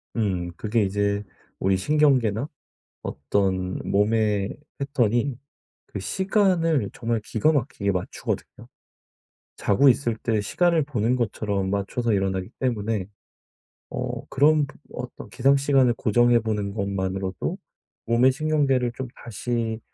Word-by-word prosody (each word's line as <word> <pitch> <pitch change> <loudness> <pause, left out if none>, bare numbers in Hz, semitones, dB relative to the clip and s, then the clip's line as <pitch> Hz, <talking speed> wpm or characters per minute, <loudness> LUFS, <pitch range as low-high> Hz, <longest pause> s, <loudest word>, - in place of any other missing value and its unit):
음 95 -6 -1
그게 110 +4 0
이제 100 +1 0 0.4
우리 95 0 +2
신경계나 130 -2 +2 0.5
어떤 95 +5 -1
몸의 105 -1 +1 0.2
패턴이 130 -2 0 0.5
그 100 - -6
시간을 170 - +1
정말 115 -1 -1
기가 110 +7 +1
막히게 130 -7 -1
맞추거든요. 90 -1 -4 0.9
자고 135 +8 +4
있을 120 -2 +2
때 110 -1 0
시간을 170 - +2
보는 125 -4 0
것처럼 105 -4 -1
맞춰서 100 +4 -1
일어나기 95 -1 -1
때문에 110 -6 -1 0.8
어 - - -4
그런 150 +2 +4
부 140 - -15 0.2
어떤 125 0 -7
기상 135 +2 +3
시간을 135 -3 +3
고정해 120 +1 +3
보는 105 -3 -2
것만으로도 95 -2 -2 0.5
몸의 120 +3 +5
신경계를 140 -4 +1
좀 130 0 -4 0.2
다시 115 0 -2
115 Hz, 260 characters per minute, -24 LUFS, 100-135 Hz, 0.9 s, 몸의